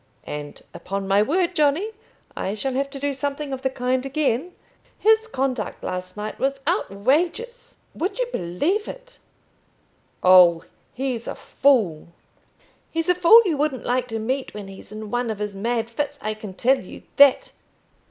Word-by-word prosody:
And, 145 0 -7
upon 195 +1 -5
my 195 +1 +4
word, 350 - +1
Johnny, 310 +8 +2 0.4
I 195 - -3
shall 265 +5 -3
have 275 +2 -1
to 275 0 -8
do 285 0 -1
something 280 +1 -3
of 260 - -5
the 265 - 0
kind 255 0 -1
again. 280 +3 -1 0.4
His 445 +1 +3
conduct 260 - -3
last 185 +1 -5
night 210 +1 -5
was 275 0 0
outrageous; 355 - -1 0.2
would 365 +8 -3
you - - +1
believe 290 - -1
it - - -10 0.5
" - - -37
"Oh, 180 -2 +7 0.3
he's 255 -3 -3
a - - -4
fool." 220 - +1 0.8
"He's 330 +2 -2
a - - +6
fool 360 +6 +7
you 330 -6 0
wouldn't 285 -3 -1
like 250 0 0
to 225 -2 -4
meet 255 +4 -3
when 205 -2 -7
he's 195 +1 -12
in 215 0 -7
one 245 -1 -1
of 220 - -3
his 210 0 -4
mad 225 +3 -1
fits, 285 +4 -3
I 215 +1 -3
can 215 -3 -9
tell 265 +6 +3
you 185 - -11
that. 280 -2 +6
260 Hz, 170 wpm, -23 LUFS, 210-305 Hz, 0.8 s, Oh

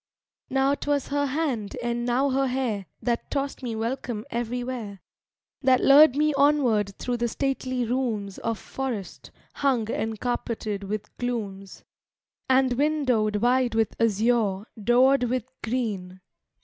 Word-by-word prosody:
II - - -6
Now 270 +1 +3
'twas 285 -1 -1
her 285 0 +1
hand 265 -8 -2
and 240 0 -1
now 265 +3 +2
her 270 +1 +2
hair 245 -7 -2 0.2
That 235 -1 -1
tossed 275 0 -2
me 240 -3 -3
welcome 230 -1 -3
everywhere; 240 -3 -4 0.6
That 260 -2 +4
lured 280 0 +7
me 300 +1 +2
onward 260 -9 +2
through 245 -1 -2
the 235 0 0
stately 255 0 -1
rooms 225 -5 -2
Of 230 -1 -2
forest, 245 -8 -5 0.2
hung 245 -6 0
and 220 -1 -3
carpeted 220 -4 -3
with 210 +1 -5
glooms, 205 -6 -4 0.7
And 260 -1 +4
windowed 255 -7 +1
wide 245 +2 +2
with 225 -1 +1
azure, 220 -2 +2 0.2
doored 250 +3 +4
with 250 0 -2 0.2
green. 205 -6 -3
245 Hz, 135 wpm, -26 LUFS, 220-265 Hz, 0.7 s, lured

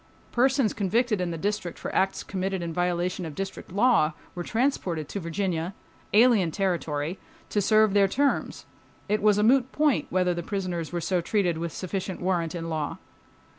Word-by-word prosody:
Persons 260 -1 +2
convicted 215 +1 +1
in 180 - -1
the 165 - -4
District 200 -1 -2
for - - -6
acts 190 0 +1
committed 190 -1 -3
in 165 -1 -4
violation 180 +1 -1
of 160 -3 -6
District 195 0 -6
law 200 -6 +3 0.2
were 175 - -5
transported 185 - -1
to 200 - -4
Virginia—alien 190 +4 +1
territory—to 170 +2 -2
serve 215 0 +4
their 200 -1 +5
terms. 280 +8 0 0.4
It 210 +1 +1
was 210 -1 +4
a 210 - +2
moot 260 +3 +4
point 300 -2 +2
whether 180 -1 +2
prisoners 180 -3 -3
were 175 -1 -2
so 180 +1 0
treated 175 -3 0
with 170 0 -3
sufficient 185 +2 -4
warrant 175 -2 -1
in 165 -1 -4
law. 155 -2 -3
190 Hz, 160 wpm, -26 LUFS, 170-210 Hz, 0.4 s, their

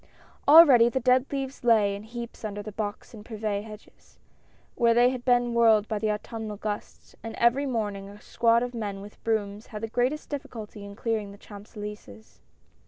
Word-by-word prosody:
LREADY 280 -6 +8
the 260 - -1
dead 255 +2 +3
leaves 270 -1 -4
lay 215 -4 +3
in 200 - -8
heaps 235 +2 -9
under 205 -1 -5
the 215 - -7
Jl\. - - -26
Box 210 +1 -5
and 215 -2 -10
Privet 215 -2 -3
hedges, 215 -1 -14 0.6
where 235 -1 +3
they 245 +1 +5
had 255 -2 -6
been 245 -1 +2
whirled 225 -3 +4
by 215 -2 -2
the 215 0 0
Autumnal 215 0 -5
gusts, 210 0 -6
and 225 -1 -7
every 250 +4 +2
morning 205 -5 -3
a 205 +1 -13
squad 230 +2 +2
of 245 0 -5
men 205 -4 -4
with 205 +1 -13
brooms 210 -1 -2
had 210 0 -8
the - - -1
greatest 250 +6 -1
difficulty 235 -8 -7
in 200 0 -10
clearing 215 -2 -2
the 200 - -13
Champs 205 +1 -13
Elysees. 205 - -10
220 Hz, 190 wpm, -26 LUFS, 210-240 Hz, 0.6 s, LREADY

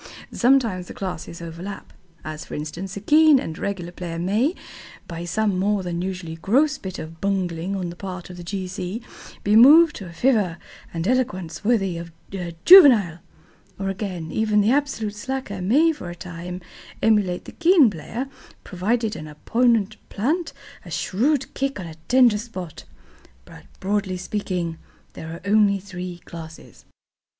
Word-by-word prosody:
Sometimes 235 -8 +2
the - - -9
classes 175 -3 -6
overlap. 170 +4 -8 0.3
As 155 0 -6
for - - -8
instance, 175 +6 -5
a - - -3
keen 305 +4 +6
and 160 -9 -5
regular 185 -4 -3
player 175 -2 -6
may, 215 - +1 0.5
by 170 0 -6
some 200 +1 0
more 200 0 +1
than 175 -1 -3
usually 180 -3 -5
gross 275 - +2
bit 190 -5 -6
of 160 +1 -9
bungling 190 -2 -1
on 180 -3 -3
the - - -10
part 185 -1 -7
of 180 - -10
the 175 - -8
G. 185 +1 -4
C., 185 +5 -5 0.4
be 205 +1 +3
moved 300 +8 +8
to 195 - -8
a - - -10
fervour 200 -3 +1 0.3
and 165 +1 -3
eloquence 185 -11 -1
worthy 195 -6 +1
of 170 0 -8 0.5
Juvenal. 235 - +8 0.6
Or, 195 0 -2
again, 185 -4 -4
even 215 -1 +2
the 210 +3 +3
absolute 270 -7 0
slacker 210 -3 -5
may 285 - +4
for 290 - -7
a 175 - -7
time 180 0 -7 0.4
emulate 205 -5 +2
the - - -9
keen 335 -4 +5
player, 225 - -5 0.4
provided 215 +4 -1
an 155 - -7
opponent 220 +6 +1
plant 310 - -1 0.3
a - - -11
shrewd 265 +8 0
kick 275 -3 -2
on 185 - -5
a 165 - -8
tender 245 -4 +5
spot. 185 -8 -8 0.6
But, - - -14
broadly 195 -1 -1
speaking, 180 -4 -3 0.3
there 160 - -8
are 165 - -8
only 205 -1 +4
three 180 -2 -7
classes. 160 -1 -11
195 Hz, 160 wpm, -23 LUFS, 175-230 Hz, 0.6 s, moved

